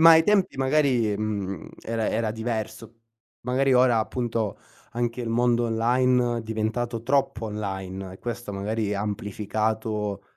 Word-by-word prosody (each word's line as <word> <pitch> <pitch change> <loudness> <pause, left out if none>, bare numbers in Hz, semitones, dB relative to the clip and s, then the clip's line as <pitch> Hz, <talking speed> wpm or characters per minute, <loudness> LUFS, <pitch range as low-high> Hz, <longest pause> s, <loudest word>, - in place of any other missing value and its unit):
ma 165 +1 +10
ai 160 0 +8
tempi 195 -3 +2
magari, 130 -6 +2
mhmm, 100 -4 -3
era 115 -1 -1
era 110 0 0
diverso. 115 0 -4 0.4
Magari 130 +2 +2
ora, 125 -2 +5
appunto, 115 -2 -1 0.3
anche 120 +1 -1
il 120 - -3
mondo 120 +1 +2
online, 120 +1 +2
è - - -3
diventato 115 +1 -2
troppo 125 -3 +1
online, 95 -3 -5
e 95 - -11
questo 120 -3 -5
magari 105 +1 -1
ha 100 - -2
amplificato 105 0 -2
115 Hz, 140 wpm, -26 LUFS, 105-120 Hz, 0.4 s, ma